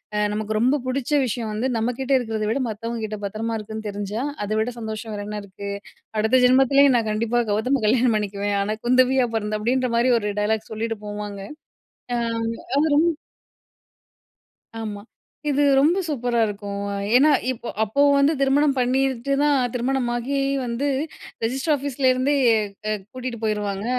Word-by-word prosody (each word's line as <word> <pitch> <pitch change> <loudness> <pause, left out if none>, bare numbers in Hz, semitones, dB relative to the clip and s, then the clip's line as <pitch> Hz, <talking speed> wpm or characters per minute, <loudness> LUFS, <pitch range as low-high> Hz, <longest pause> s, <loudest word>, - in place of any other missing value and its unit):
அ - - 0
நமக்கு 215 +1 -2
ரொம்ப 260 +6 +3
பிடிச்ச 255 +1 -2
விஷயம் 230 -2 -3
வந்து 220 +5 -1
நம்ம 230 +3 0
கிட்ட 265 +1 -3
இருக்கிறத 220 -3 -2
விட, 235 +5 0
மத்தவங்க 230 +1 -4
கிட்ட 215 0 -5
பத்திரமா 225 +3 -3
இருக்குன்னு 220 0 -7
தெரிஞ்சா, 205 +3 -4 0.2
அத - - -7
விட 235 +3 -1
சந்தோஷம் 220 0 -5
வேற 205 - -5
என்ன 210 0 -4
இருக்கு! 200 +1 -8 0.5
அடுத்த 230 +4 +3
ஜென்மத்திலேயும் 270 +1 +5
நான் 225 -2 -1
கண்டிப்பா 230 +3 0
கௌதம 250 +5 +1
கல்யாணம் 235 0 +3
பண்ணிக்குவேன். 205 -1 -2
ஆனா 210 +2 -1
குந்தவியா 255 +1 +4
பிறந்து" 215 -1 -2
அப்படின்ற 250 +3 +1
மாதிரி 240 +2 +3
ஒரு 210 -2 -3
டயலாக் 215 +1 -1
சொல்லிட்டு 225 0 -3
போவாங்க. 205 -1 -6 0.7
அ - - +1 0.6
அவரும் 305 +2 +3 1.7
ஆமா! 210 -2 -5 0.5
இது 290 0 +2 0.2
ரொம்ப 315 +7 +4
சூப்பரா 245 -5 -1
இருக்கும். 200 -1 -5 0.3
ஏன்னா 290 +5 +6 0.2
இப்போ 240 -1 -6
அப்போ 220 +6 0 0.2
வந்து 280 +3 +4
திருமணம் 275 +1 +3
பண்ணிட்டு 260 +1 +1
தான் 295 -1 +4 0.2
திருமணமாகி 250 +1 -1 0.3
வந்து 240 +4 -2 0.6
ரெஜிஸ்டர் 265 +7 0
ஆஃபீஸ்லிருந்தே 265 -1 +1 0.6
அ - - +1 0.2
கூட்டிகிட்டு 250 -3 -5
போயிருவாங்க. 205 -2 -1
235 Hz, 145 wpm, -23 LUFS, 215-260 Hz, 1.7 s, ஏன்னா